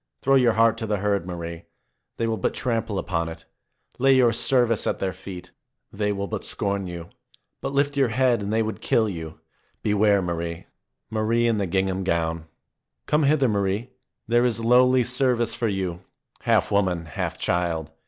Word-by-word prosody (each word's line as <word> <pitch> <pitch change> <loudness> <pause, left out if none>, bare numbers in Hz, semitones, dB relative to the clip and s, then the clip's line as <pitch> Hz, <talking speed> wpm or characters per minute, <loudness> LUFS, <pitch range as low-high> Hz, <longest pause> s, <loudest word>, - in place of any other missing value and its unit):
Throw 135 - +3
your 125 -4 +5
heart 115 0 +3
to 110 - -3
the 105 -1 0
herd, 100 -2 -1
Marie. 85 -1 -6 0.5
They 115 - 0
will 115 0 0
but - - -1
trample 115 -4 -1
upon 85 -2 -2
it. 80 0 -10 0.5
Lay 135 +1 +5
your 120 -3 +4
service 120 -2 +2
at - - 0
their 95 -1 -2
feet. 90 -2 -10 0.4
They 105 0 -1
will 100 0 -2
but 100 - -5
scorn 100 -1 -2
you. 85 -1 -7 0.5
But 135 - -3
lift 140 +1 +1
your 135 -2 +3
head, 120 0 +2
and 100 +1 -3
they 110 +1 +2
would 110 0 -5
kill 110 -1 +2
you. 80 -5 -6 0.4
Beware, 105 -1 +3
Marie 85 -1 -2
I - - -16 0.5
Marie 110 +2 +1
in 115 -2 +2
the 100 - -1
gingham 95 +1 0
gown! 80 -2 -1 0.6
Come 150 - +2
hither, 140 -2 +3
Marie! 100 +3 -1 0.4
There 120 +1 +3
is 120 -2 +1
lowly 125 +2 +4
service 125 -2 +1
for 115 - -1
you, 95 -3 -3 0.4
half - - +1
woman, 95 -4 +1
half 80 - -4
child. 85 -3 -1
105 Hz, 180 wpm, -24 LUFS, 90-120 Hz, 0.6 s, your